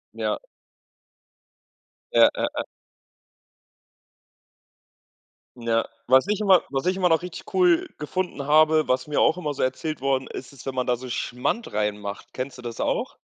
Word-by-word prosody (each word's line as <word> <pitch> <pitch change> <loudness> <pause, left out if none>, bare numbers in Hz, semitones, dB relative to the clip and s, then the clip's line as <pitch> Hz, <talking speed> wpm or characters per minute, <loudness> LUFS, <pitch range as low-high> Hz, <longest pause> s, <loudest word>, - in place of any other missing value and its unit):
Ja. - - -1 1.7
Ja, - - +7
ja, - - 0
ja. - - -1 2.9
Ja. 115 -1 0 0.2
Was 130 +8 +5
ich 210 0 0
immer 190 -3 +5
was 135 -1 -2
ich 185 +1 +1
immer 185 -2 +3
noch 165 -1 +3
richtig 180 -1 -8
cool 180 -3 +4
gefunden 155 -1 -3
habe, 155 0 +4
was 130 +1 +1
mir 150 - +1
auch 160 - +4
immer 150 -5 -2
so - - -2
erzählt 130 +3 -2
worden 135 -1 0
ist, 130 - -8
ist 140 -4 -14
wenn 135 - -4
man 125 -1 0
da 125 -1 +1
so 125 +1 -8
Schmand 125 - -2
reinmacht. 105 -1 -3
Kennst 130 +1 -5
du 125 - -10
das 120 -1 -6
auch? - - -1
140 Hz, 160 wpm, -24 LUFS, 125-170 Hz, 2.9 s, Ja